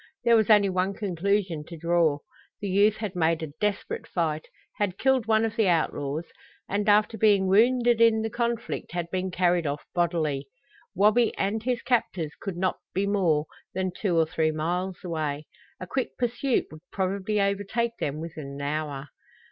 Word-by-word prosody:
There 235 -1 +5
was 220 -1 +3
only 205 -2 +6
one 185 +1 0
conclusion 190 -4 -1
to 170 - -8
draw. 165 -2 +2 0.4
The 200 - -4
youth 205 +3 +4
had 210 -4 -4
made 165 -1 +1
a 150 -2 -6
desperate 210 -1 -2
fight, 155 -3 -2 0.3
had 200 -3 -1
killed 265 -3 +2
one 220 0 +3
of 225 0 -3
the 220 -3 +2
outlaws, 155 -2 0 0.4
and 205 +1 0
after 210 +1 +3
being 205 -2 +4
wounded 235 +4 +4
in 225 -1 +5
the 225 - -1
conflict 235 -3 -3
had 170 -1 -3
been 185 0 -1
carried 175 -2 +1
off 145 +1 -4
bodily. 155 -6 0 0.5
Wabi 215 +5 +3
and 205 +3 0
his 245 +1 -1
captors 185 - 0
could 195 -4 -4
not 185 +1 0 0.2
be 195 +2 +1
more 175 -7 +2 0.3
than 185 0 -1
two 180 -6 0
or 165 - +4
three 160 0 0
miles 175 +4 -2
away. 155 -4 -3 0.3
A - - -5
quick 260 +7 -3
pursuit 245 +2 0
would 155 0 -11
probably 200 +2 -1
overtake 205 +4 0
them 145 +1 -2
within 160 -3 -7
an 140 - -7
hour. 145 -1 -3
190 Hz, 170 wpm, -26 LUFS, 165-215 Hz, 0.5 s, only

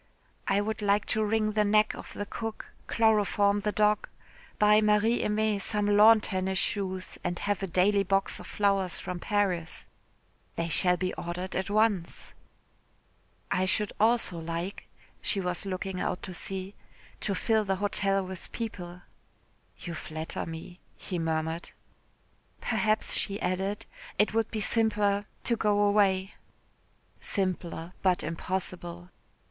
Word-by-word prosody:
"I 195 +1 +3
would 220 +1 -3
like 205 0 +2
to 220 - +1
wring 215 0 +1
the 210 0 +2
neck 210 +1 +3
of - - -9
the 205 - -4
cook, 225 +1 -6 0.2
chloroform 205 -2 +3
the 210 +1 -1
dog, 210 0 +2 0.5
buy 210 0 +5
Marie 210 +2 +3
Aimée 210 -1 +1
some 210 +1 +1
lawn 210 +2 +7
tennis 190 -1 -1
shoes, 190 -2 -1
and 175 0 -2
have 205 +1 -1
a 195 - -2
daily 195 +3 +3
box 195 0 0
of - - -10
flowers 195 -3 +1
from 180 -1 -5
Paris." 185 -5 -1 0.7
"They 165 0 -2
shall 180 +3 +4
be 185 +1 -2
ordered 180 +2 -5
at 190 0 -1
once." 205 -4 0 1.2
"I 185 +1 +2
should 210 +2 0
also 220 -5 +3
like," 170 +4 -5 0.3
she 200 - 0
was 180 +1 -1
looking 185 0 -3
out 180 - -2
to 185 - -6
sea, 190 +2 -5 0.5
"to 200 - -1
fill 220 +2 +2
the 195 -1 0
hotel 195 0 +2
with 185 -1 -8
people." 180 -6 -6 0.7
"You 170 - -6
flatter 155 0 -4
me," 165 +2 -8 0.2
he 180 - -4
murmured. 160 +1 -2 0.9
"Perhaps," 215 0 +1
she 200 0 0
added, 190 +3 -2 0.3
"it 210 +2 +3
would 225 0 +1
be 220 - -3
simpler 205 -2 +1 0.2
to 235 - +1
go 210 -2 +2
away." 200 -2 +3 0.9
"Simpler 180 -3 -2
but 185 -2 +2
impossible." 175 +1 -4
195 Hz, 140 wpm, -29 LUFS, 180-210 Hz, 1.2 s, lawn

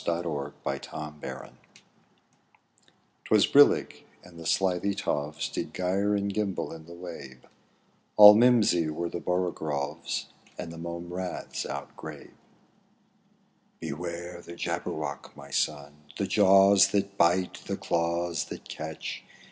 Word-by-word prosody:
Edward 85 -5 -2
Lear, - - -1
JABBERWOCKY 75 -1 -8 1.7
'TwAS - - +4
brillig, - - +4 0.2
and 85 -1 -14
the 80 - -6
slithy 95 +1 +1
toves 75 0 -2
Did - - -5
gyre 95 +3 +1
and 100 0 -1
gimble 100 -3 -2
in 80 -1 -11
the 85 - -10
wabe; 80 -8 -9 0.7
All 105 0 +12
mi 115 +4 +6
rosy 100 -10 +3
were 85 +2 -3
the 85 - -5
borogoves, 80 -4 -2 0.3
And 85 -2 -6
the 85 - -9
mome 85 +1 -6
raths 90 0 -4
outgrabe. - - -8 1.5
''Beware 85 +2 -6
the 85 - -10
Jabberwock, 75 -3 -4
my 70 0 -12
son! 75 0 -1 0.2
The 100 - 0
jaws 100 0 +6
that 100 -1 0
bite, 90 +1 +2
the - - -2
claws 85 -1 -1
that - - -9
catch! 80 0 -6
85 Hz, 125 wpm, -28 LUFS, 80-95 Hz, 1.7 s, All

